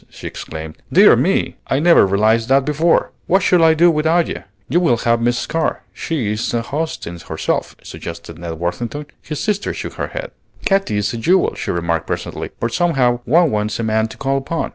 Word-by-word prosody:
she -, -, -12 dB
exclaimed. 80 Hz, 0 st, -7 dB
"Dear -, -, +7 dB
me! -, -, 0 dB
I 135 Hz, -, +1 dB
never 165 Hz, -, +5 dB
realized 110 Hz, +4 st, +2 dB
that 135 Hz, 0 st, +4 dB
before. 155 Hz, +3 st, +2 dB, 0.2 s
What 190 Hz, +1 st, +3 dB
shall 180 Hz, -2 st, +4 dB
I 160 Hz, 0 st, +5 dB
do 170 Hz, +2 st, +5 dB
without 160 Hz, +2 st, +2 dB
you?" -, -, -5 dB, 0.3 s
"You 175 Hz, -, +2 dB
will 165 Hz, -10 st, +2 dB
have 115 Hz, 0 st, +1 dB
Miss 120 Hz, +1 st, 0 dB
Carr. 165 Hz, +1 st, -2 dB
She 135 Hz, -11 st, -2 dB
is 105 Hz, +1 st, -2 dB
a 115 Hz, -, 0 dB
host 155 Hz, +6 st, -3 dB
in 85 Hz, 0 st, -7 dB
herself," 80 Hz, -1 st, -3 dB
suggested 85 Hz, 0 st, -8 dB
Ned 85 Hz, -1 st, -5 dB
Worthington. 110 Hz, -, -4 dB, 0.2 s
His 150 Hz, -2 st, -6 dB
sister 210 Hz, -2 st, -1 dB
shook -, -, -6 dB
her -, -, -1 dB
head. -, -, -6 dB, 0.3 s
"Katy 195 Hz, -, +1 dB
is 105 Hz, +1 st, -1 dB
a -, -, -3 dB
jewel," 180 Hz, +11 st, +2 dB
she -, -, -5 dB
remarked 85 Hz, -2 st, -1 dB
presently; -, -, -4 dB
"but 115 Hz, -, -2 dB
somehow 135 Hz, -9 st, +2 dB
one 165 Hz, +2 st, +4 dB
wants 105 Hz, +1 st, -1 dB
a -, -, -1 dB
man 110 Hz, 0 st, +1 dB
to 110 Hz, -, -12 dB
call 135 Hz, 0 st, 0 dB
upon. 160 Hz, +4 st, -3 dB
120 Hz, 205 wpm, -18 LUFS, 105-165 Hz, 0.3 s, Dear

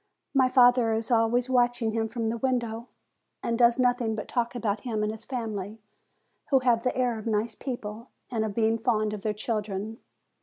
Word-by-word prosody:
My 265 Hz, -2 st, +4 dB
father 245 Hz, -3 st, +5 dB
is 225 Hz, +3 st, -2 dB
always 235 Hz, +2 st, +3 dB
watching 245 Hz, -3 st, +2 dB
him 225 Hz, 0 st, -1 dB
from 225 Hz, -1 st, -2 dB
the 230 Hz, +1 st, -3 dB
window, 235 Hz, -3 st, -1 dB, 0.6 s
and 230 Hz, -, 0 dB
does 235 Hz, +1 st, +4 dB
nothing 245 Hz, -3 st, +1 dB
but 215 Hz, -, -5 dB
talk 240 Hz, 0 st, -1 dB
about 215 Hz, -3 st, -1 dB
him 220 Hz, -2 st, -2 dB
and 210 Hz, -, 0 dB
his 220 Hz, +1 st, -10 dB
family, 220 Hz, -4 st, -4 dB, 0.7 s
who 275 Hz, -, +5 dB
have 240 Hz, -3 st, +3 dB
the 250 Hz, +1 st, -1 dB
air 245 Hz, -3 st, +1 dB
of 215 Hz, -, -7 dB
nice 220 Hz, +1 st, 0 dB
people, 230 Hz, -3 st, -6 dB, 0.2 s
and 225 Hz, -3 st, 0 dB
of 210 Hz, -2 st, -3 dB
being 225 Hz, 0 st, +2 dB
fond 215 Hz, -3 st, +1 dB
of 210 Hz, -, -5 dB
their 215 Hz, -, 0 dB
children. 215 Hz, 0 st, -3 dB
230 Hz, 190 wpm, -27 LUFS, 220-245 Hz, 0.7 s, father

